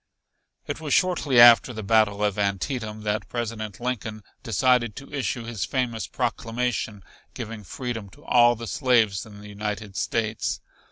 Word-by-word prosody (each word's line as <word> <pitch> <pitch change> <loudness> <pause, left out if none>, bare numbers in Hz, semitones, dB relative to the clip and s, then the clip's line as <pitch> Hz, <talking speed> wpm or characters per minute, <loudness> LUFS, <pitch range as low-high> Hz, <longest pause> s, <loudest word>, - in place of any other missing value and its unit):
It - - -5
was 150 -4 +1
shortly 160 -8 +2
after 120 0 +8
the 110 -1 -6
battle 105 -1 +3
of 105 -1 0
Antietam 105 +2 -2
that 105 0 -2
President 110 -4 -4
Lincoln 110 -4 -4 0.2
decided 120 0 +2
to 140 +1 -10
issue 130 -3 -2
his 115 -4 -4
famous 120 -5 -2
proclamation 115 -3 -2 0.3
giving 110 -2 -6
freedom 115 -1 -5
to 145 +8 -19
all 120 0 +5
the 115 +1 -7
slaves 110 -3 +2
in 105 -1 -12
the 105 - -11
United 105 -1 -5
States. 110 0 -1
115 Hz, 150 wpm, -25 LUFS, 105-125 Hz, 0.3 s, after